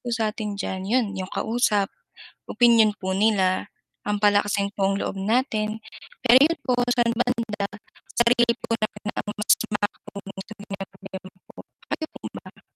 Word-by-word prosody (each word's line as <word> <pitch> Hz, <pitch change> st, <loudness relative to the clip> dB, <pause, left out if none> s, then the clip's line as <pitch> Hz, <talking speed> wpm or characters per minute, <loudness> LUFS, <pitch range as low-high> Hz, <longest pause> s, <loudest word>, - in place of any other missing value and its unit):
po 245 Hz, -, -7 dB
satin 215 Hz, -3 st, -2 dB
dyan 190 Hz, -1 st, -4 dB
yun 240 Hz, 0 st, +3 dB
yung 185 Hz, -, -4 dB
kausap, 220 Hz, -3 st, +1 dB, 0.6 s
opinyon 230 Hz, -3 st, +5 dB
po 190 Hz, -1 st, -3 dB
nila 195 Hz, -2 st, +2 dB, 0.4 s
ang 210 Hz, -, +1 dB
palakasin 205 Hz, -1 st, +2 dB
pong 195 Hz, 0 st, 0 dB
loob -, -, -3 dB
natin 220 Hz, -1 st, 0 dB, 0.4 s
pero 255 Hz, +1 st, +8 dB
'yon 320 Hz, +3 st, +4 dB
po 250 Hz, -1 st, +1 dB
sa 245 Hz, 0 st, +3 dB
talaga 230 Hz, -3 st, -1 dB, 0.5 s
sarili 235 Hz, 0 st, +4 dB
lang 235 Hz, -, +2 dB
din -, -, -65 dB
po -, -, -5 dB
ang 230 Hz, -, 0 dB, 0.2 s
makakatulong 210 Hz, 0 st, -4 dB
sa -, -, +6 dB
atin, 205 Hz, -, 0 dB
kayo 205 Hz, 0 st, -1 dB, 2.5 s
po -, -, -12 dB
ba? -, -, -22 dB
215 Hz, 140 wpm, -24 LUFS, 205-235 Hz, 2.5 s, pero